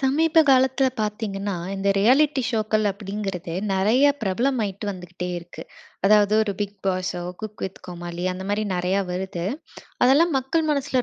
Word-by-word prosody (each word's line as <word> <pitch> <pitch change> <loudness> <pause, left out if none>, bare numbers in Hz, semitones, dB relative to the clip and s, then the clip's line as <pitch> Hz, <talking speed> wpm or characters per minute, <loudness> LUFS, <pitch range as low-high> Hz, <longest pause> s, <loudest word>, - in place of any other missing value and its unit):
சமீப 305 +4 +3
காலத்தில 265 0 +4
பார்த்தீங்கன்னா, 205 -2 -3 0.2
இந்த 195 +1 -1
ரியாலிட்டி 265 +6 +4
ஷோக்கள் 215 -2 +1
அப்பிடிங்கிறது 195 -3 -5 0.2
நிறைய 215 +8 +3 0.2
பிரபலமாயிட்டு 210 -1 -1
வந்துகிட்டே 180 -1 -6
இருக்கு. 170 0 -10 0.4
அதாவது 210 0 +5
ஒரு 210 -2 -1
பிக் 205 0 -3
பாஸோ! 185 -1 -1 0.2
குக் 215 -1 -7
வித் 190 0 -7
கோமாளி, 175 0 -6
அந்தமாரி 200 +3 -2
நிறையா 180 +2 +1
வருது. 180 -2 -4 0.6
அதெல்லாம் 290 +6 +4
மக்கள் 270 +5 0
மனசில 280 -3 0
205 Hz, 130 wpm, -23 LUFS, 190-255 Hz, 0.6 s, அதாவது